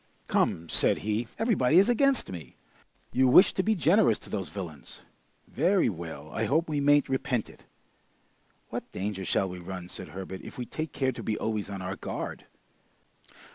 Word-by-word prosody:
"Come!" 85 +1 +1
said - - +3
be. 110 +3 -1
"Everybody 175 - +3
is 195 - +7
against 265 - +2
me! 80 -8 -9 0.6
You 130 +1 +4
wish 180 +10 +7
to - - +1
be 220 +3 +1
generous 175 - +4
to - - -13
those 95 -6 -3
villains! 80 -6 -8 0.5
Very 175 +3 +2
well; 80 -5 -7
I 110 - -1
hope 160 +9 +1
we 150 -2 -1
mayn't 145 +1 +4
repent 130 -3 -1
it!" - - -20 1.0
"What - - -6
danger 95 0 -3
shall 95 +2 +1
we 90 -1 -7
run," 90 0 -7
said - - -7
Herbert, 95 0 -7
"if - - -10
we 125 - -4
take 155 +4 -5
care 130 -1 0
to 120 - -8
be 110 - -2
always 110 -2 -2
on 95 -2 -5
our 95 +1 -4
guard?" - - -5
110 Hz, 175 wpm, -28 LUFS, 95-155 Hz, 1.0 s, is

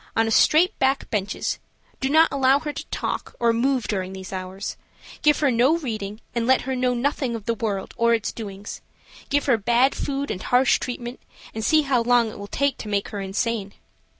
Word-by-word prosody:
on 225 0 +2
straight 340 - +4
back 270 +1 +1
benches, 200 -2 -2 0.4
do 265 - -1
not 320 +3 +6
allow 270 0 +4
her 295 +1 -4
to - - -7
talk - - -4
or 235 -1 +3
move 255 +2 +1
during 190 -2 -2
these 190 0 -8
hours, 185 +1 -5 0.5
give 300 -1 +4
her 285 -3 +3
no 250 +7 +3
reading 215 -8 -5
and 235 -1 -1
let 260 0 +4
her 265 0 -3
know 250 0 +1
nothing 260 -1 -1
of 220 -3 -7
the 230 - +1
world 205 -4 -3
or 235 0 +4
its 225 - -2
doings, 205 -2 -8 0.5
give 285 +1 +1
her 250 -5 +4
bad 240 +5 +3
food 280 0 -3
and 185 - -4
harsh 250 +1 +3
treatment, 245 0 -5 0.3
and 220 - -4
see 310 +5 +4
how 265 -4 +2
long 235 -1 +3
it - - -11
will 200 - -7
take 280 +4 0
to - - -7
make 200 -1 -1
her 205 - -5
insane. 200 +1 -2
235 Hz, 205 wpm, -23 LUFS, 210-270 Hz, 0.5 s, not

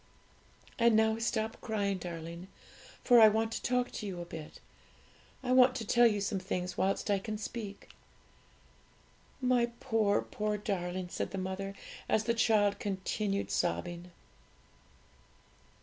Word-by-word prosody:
And 235 -1 +5
now 220 0 +3
stop 225 -1 -2
crying, 200 -4 -1
darling, 170 +1 -7 0.6
for 245 -2 +7
I 220 - +10
want 220 +1 +1
to - - -4
talk 250 0 0
to 210 - -5
you 185 -3 -5
a 175 - -5
bit; 160 -3 -9 0.8
I 250 - -1
want 255 0 +6
to 230 - -4
tell 240 +3 +5
you 210 -2 0
some 200 0 -1
things 185 -1 -3
whilst 195 +2 0
I 200 - +2
can 215 +2 -5
speak. 210 -1 -7 1.5
'My 250 -2 +3
poor, 220 -5 +1
poor 210 0 -2
darling!' 185 -3 -3
said - - -3
the 195 - -6
mother, 190 +1 -4 0.3
as 220 - +2
the 235 +1 +1
child 215 -3 +3
continued 200 0 -2
sobbing. 175 0 -2
205 Hz, 140 wpm, -32 LUFS, 190-225 Hz, 1.5 s, I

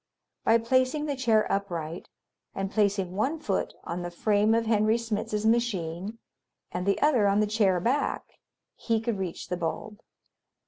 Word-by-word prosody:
By 225 - +5
placing 255 +5 +1
the 290 -2 -2
chair 230 -5 +3
upright 175 -4 -3 0.5
and 195 0 -3
placing 200 -4 +1
one 265 +10 0
foot 200 -10 -2
on 175 +1 -4
the 175 - -4
frame 210 +4 +2
of 230 0 +1
Henry 220 0 +3
Smitz's 215 -2 -2
machine 210 -4 0 0.5
and 180 +2 -3
the 200 - +2
other 255 -9 +4
on 200 +1 +3
the 215 - +3
chair 205 -4 +2
back, 260 +10 0 0.5
he 225 -2 0
could 225 -2 -2
reach 180 -3 -5
the 180 - -1
bulb. 180 +6 -4
210 Hz, 155 wpm, -27 LUFS, 190-230 Hz, 0.5 s, By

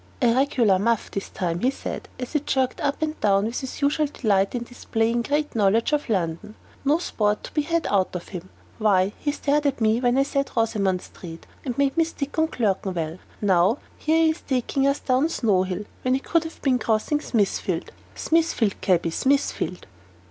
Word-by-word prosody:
"A 240 -3 +4
regular 240 -7 +3
muff, 230 +2 0
this 195 - -4
time," 175 -2 -2
he 250 - +2
said, 275 - -6
as 250 +3 -6
he 300 - +3
jerked 265 -3 -1
up 285 +2 -1
and 310 0 -3
down 200 -1 +3
with 230 +2 -2
his 265 +1 -6
usual 295 +2 +2
delight 205 -7 +1
in 240 - -2
displaying 235 -1 -1
great 295 +4 -1
knowledge 225 +5 +2
of 295 -4 0
London; 190 +1 -2 0.3
"no 290 +3 +3
sport 210 -11 -1
to - - -9
be 300 - +2
had 335 +2 -1
out 190 -2 +1
of 175 - -6
him. 185 -1 -7 0.3
Why, 200 -2 +3
he 290 - 0
stared 290 0 +1
at 275 -2 -1
me 220 +1 +2
when 245 0 +2
I 275 - +5
said 275 0 -1
'Rosamond 200 -5 +1
Street,' 165 -2 -11 0.2
and 250 -4 -4
made 280 -1 +2
me 330 - +5
stick 310 -2 -4
on 320 - +3
'Clerkenwell.' 190 - -2 0.2
Now 195 +3 +3 0.2
here 320 +1 +2
he 320 - +5
is 315 - -7
taking 270 +1 0
us 275 +1 +2
down 260 +4 +1
Snow 210 - +2
Hill, 185 +2 -3 0.2
when 255 0 +2
he 270 - -3
should 335 -1 +3
have 320 - -9
been 255 -3 +3
crossing 230 +7 0
Smithfield. 210 -9 -1 0.2
Smithfield, 320 - +1
cabby, 175 -3 +2
Smithfield!" 270 - 0
240 Hz, 195 wpm, -24 LUFS, 200-285 Hz, 0.3 s, I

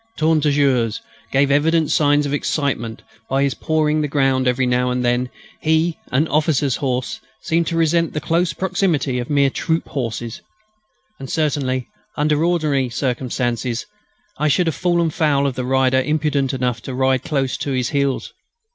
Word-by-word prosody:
"Tourne 160 0 +2
Toujours" 135 -6 +2 0.3
gave 140 +1 +3
evident 160 +2 +2
signs 145 -1 +3
of 140 - -2
excitement. 140 -6 -2 0.3
By 135 +1 +2
his 140 -2 +1
pawing 155 -1 0
the 150 - 0
ground 135 -2 +1
every 125 +1 +2
now 125 0 +1
and 125 0 -1
then 120 +1 +1 0.3
he, 160 +1 +1
an 145 +5 +2
officer's 150 -3 +1
horse, 130 -3 -2 0.2
seemed 165 0 0
to 165 - -1
resent 165 0 +2
the 150 - -1
close 165 +2 +1
proximity 150 -5 0
of 120 - -5
mere 140 -2 +3
troop 165 +3 -1
horses. 115 -3 -4 0.8
And 135 - -7
certainly, 135 -5 -1 0.3
under 150 +1 +2
ordinary 155 -7 +1
circumstances, 125 -1 -2 0.5
I 150 - +2
should 175 +5 +2
have 165 - -1
fallen 170 -2 +1
foul 145 -3 +1
of 140 - 0
the 125 0 -4
rider 130 0 +2
imprudent 150 -2 0
enough 125 -3 -2
to 130 +1 -6
ride 130 0 +2
close 135 -4 -1
to 140 - -3
his 125 -2 0
heels. 140 -2 -1
140 Hz, 165 wpm, -20 LUFS, 130-155 Hz, 0.8 s, gave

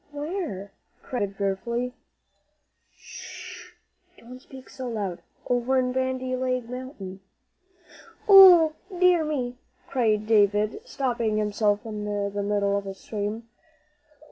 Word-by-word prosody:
"Where?" 290 - -5 0.3
cried 250 - -4
David, 200 -1 -2
fearfully. 235 +5 -2 1.0
"Sh! - - -11 0.4
don't 250 +2 -12
speak 265 -1 -13
so 260 -1 -7
loud. 200 -6 -4 0.3
Over 245 +2 +1
in 250 -1 +1
'Bandy 260 0 -1
Leg 255 -2 -2
Mountain.'" 245 -7 -8 1.1
"Ooh, 365 -6 +9 0.2
dear 360 -2 +4
me!" 255 -5 -3 0.3
cried 215 -5 +1
David, 210 - +2
stopping 240 - -1
himself 210 0 0
in 210 -2 -5
the 205 -1 -2
middle 200 0 0
of 200 0 -3
a 195 - -6
scream. 210 +3 -5
235 Hz, 115 wpm, -25 LUFS, 205-260 Hz, 1.1 s, Ooh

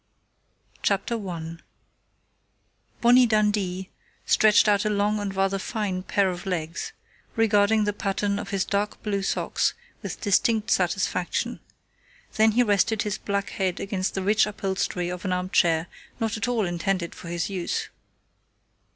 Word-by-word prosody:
] - - -35
CHAPTER 200 +4 0
ONE 170 -6 -6 1.4
Bonnie 245 +1 +6
Dundee 205 -4 0 0.3
stretched 215 0 +5
out 205 -1 +3
a 215 - 0
long 210 +1 +1
and 200 -1 -4
rather 195 0 +1
fine 195 -2 -2
pair 195 0 +1
of 180 +1 -7
legs, 165 -3 -3 0.4
regarding 215 -1 +3
the 205 0 0
pattern 200 0 -1
of - - -6
his 195 -1 0
dark 205 +1 -2
blue 200 -2 -1
socks 195 - 0 0.3
with - - -6
distinct 220 +1 +2
satisfaction; 180 0 0 0.8
then 220 0 +5
he 245 +2 +4
rested 215 0 +2
his 210 -1 -3
black 200 -1 -2
head 190 -3 -1
against 195 -1 -2
the 190 - -2
rich 210 +2 +3
upholstery 190 -3 -2
of 180 0 -5
an 190 - -2
armchair 175 -3 +2 0.3
not 225 -2 -1
at 215 +1 -2
all 235 -4 +1
intended 175 0 -1
for - - -11
his 170 +2 -2
use. 180 -3 -2
200 Hz, 145 wpm, -25 LUFS, 185-210 Hz, 1.4 s, Bonnie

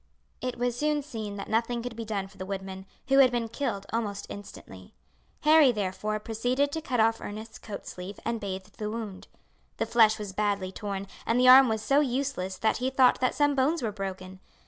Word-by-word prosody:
It 255 0 -3
was 245 0 0
soon 295 +2 0
seen 220 -7 -6
that 200 - -6
nothing 230 +1 0
could 245 -2 -5
be 230 0 -5
done 200 -3 -3
for 195 - -19
the 185 - -4
woodman, 190 -1 -6 0.2
who 270 0 +5
had 265 -2 +8
been 240 -2 -1
killed 220 -4 -3
almost 210 -3 -2
instantly. 95 - -11 0.5
Harry, 305 -3 +6
therefore, 210 0 -2
proceeded 245 +6 0
to 320 - -3
cut 255 -6 -2
off 225 +1 +3
Ernest's 220 +2 -7
coat 210 -2 -8
sleeve 185 +2 -8
and 230 0 -2
bathed 190 0 -6
the 210 -1 -2
wound. 215 -3 -6 0.5
The - - 0
flesh 220 -2 +4
was 205 -3 -6
badly 200 -2 -1
torn, 200 0 -4 0.2
and 230 +2 +2
the 255 0 +6
arm 260 0 +9
was 220 -1 -1
so 275 +6 +3
useless 260 -8 -1
that 220 - +1
he 255 +2 0
thought 260 -1 +4
that 255 - +1
some 290 -1 +3
bones 280 +3 +1
were 220 - 0
broken. 190 -2 -6
220 Hz, 205 wpm, -28 LUFS, 200-255 Hz, 0.5 s, arm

